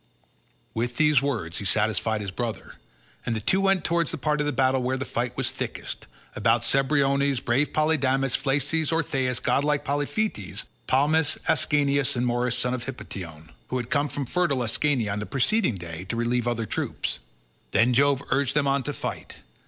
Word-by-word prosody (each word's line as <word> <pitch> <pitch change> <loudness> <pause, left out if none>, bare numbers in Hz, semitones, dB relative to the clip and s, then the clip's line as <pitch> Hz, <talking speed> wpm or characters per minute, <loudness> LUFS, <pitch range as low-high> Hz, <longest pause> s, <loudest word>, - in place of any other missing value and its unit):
With 120 +2 -2
these 150 -3 +4
words 110 -12 -2
he 100 - -5
satisfied 110 +1 +1
his 100 -2 -4
brother, 115 +2 -4 0.5
and 115 - -1
the - - -1
two 190 - +1
went 195 -2 +2
towards 170 -3 +1
the - - -3
part 150 -1 0
of 145 - 0
the - - +1
battle 130 -1 +2
where 130 +1 0
the 135 - -3
fight 125 -1 -3
was - - 0
thickest, - - -5 0.3
about - - +2
Cebriones, 140 -1 +2
brave 130 +4 +1
Polydamas, 135 -4 +2
Phalces, 145 +3 0
Orthaeus, 135 -6 0
godlike 145 0 +1
Polyphetes, 145 - -2 0.2
Palmys, 150 +3 +2
Ascanius, 140 -2 +2
and 120 0 0
Morys 120 0 0
son 125 0 0
of 125 -1 -3
Hippotion, 85 -11 -8 0.2
who 130 - -2
had 125 0 -5
come 145 0 +2
from 140 +1 -3
fertile 140 -4 +1
Ascania 120 -2 0
on 105 - -3
the 105 - -5
preceding 145 - +2
day 85 -1 -7
to 105 - -3
relieve 120 +1 0
other 115 -2 -1
troops. - - -3 0.5
Then 115 +5 +3
Jove 140 +1 +3
urged 140 0 +1
them 150 -1 +3
on 140 0 +2
to 145 +3 -4
fight. - - -6
135 Hz, 175 wpm, -25 LUFS, 120-145 Hz, 0.5 s, these